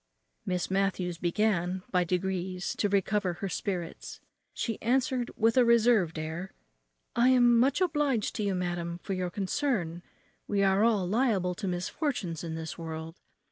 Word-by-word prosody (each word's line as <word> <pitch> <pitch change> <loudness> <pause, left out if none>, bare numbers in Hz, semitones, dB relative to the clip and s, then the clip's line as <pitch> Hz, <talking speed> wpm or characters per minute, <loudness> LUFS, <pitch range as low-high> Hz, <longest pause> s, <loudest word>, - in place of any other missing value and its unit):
Miss 180 0 -1
Matthews 190 -3 0
began, 180 0 0
by 180 -1 +3
degrees, 185 +1 -2
to 205 - +1
recover 195 -1 +1
her 195 +3 -4
spirits. 180 -2 -4 0.3
She 225 -3 -3
answered, 255 +1 +1
with 225 +2 +3
a 250 - +7
reserved 230 -8 +4
air, 160 +4 -5 0.6
"I 240 +2 +5
am 245 -2 +5
much 270 +7 +3
obliged 295 - +1
to 215 - -1
you, 200 -2 0
madam, 175 -1 -2
for 195 - -3
your 185 -1 -2
concern; 190 - -1 0.5
we 200 -1 +1
are 195 +1 +3
all 215 -6 +2
liable 205 -4 +1
to 195 +2 -5
misfortunes 180 - -2
in 165 -1 -4
this 160 +1 -6
world. 160 0 -6
190 Hz, 150 wpm, -29 LUFS, 175-230 Hz, 0.6 s, a